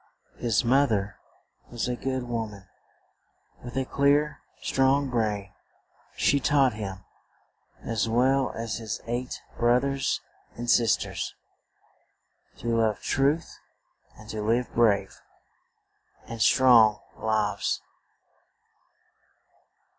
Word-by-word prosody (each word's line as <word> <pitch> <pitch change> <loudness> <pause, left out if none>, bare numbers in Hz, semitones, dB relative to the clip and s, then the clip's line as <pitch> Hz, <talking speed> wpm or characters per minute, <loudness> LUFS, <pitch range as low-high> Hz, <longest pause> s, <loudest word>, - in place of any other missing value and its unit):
His 120 0 +1
moth 135 +3 +4
er 100 -1 -1 0.5
was 120 0 -3
a 125 - -1
good 130 0 -3
wo 115 -2 -3
man, 100 -2 -13 1.0
with 120 +1 -7
a 135 - 0
clear, 145 +2 +2 0.2
strong 135 0 +2
brain; 105 -4 -1 0.6
she 140 - +2
taught 135 -3 +3
him, 100 -3 -7 0.8
as 115 0 -1
well 130 +3 +2
as 115 -1 -3
his 110 -2 -5
eight 120 +2 -4 0.2
broth 120 +2 +3
ers 135 -1 -1 0.4
and 120 +1 -6
sis 115 -1 +4
ters, - - -5 1.2
to 115 -1 -1
love 110 -2 +1
truth, 145 +5 0 0.6
and 105 - -14
to 110 - -4
live 115 +3 0
brave 100 -4 +2 1.0
and 115 -1 -7
strong 115 -3 +6 0.2
lives. 105 -2 -1
120 Hz, 110 wpm, -26 LUFS, 110-130 Hz, 1.2 s, strong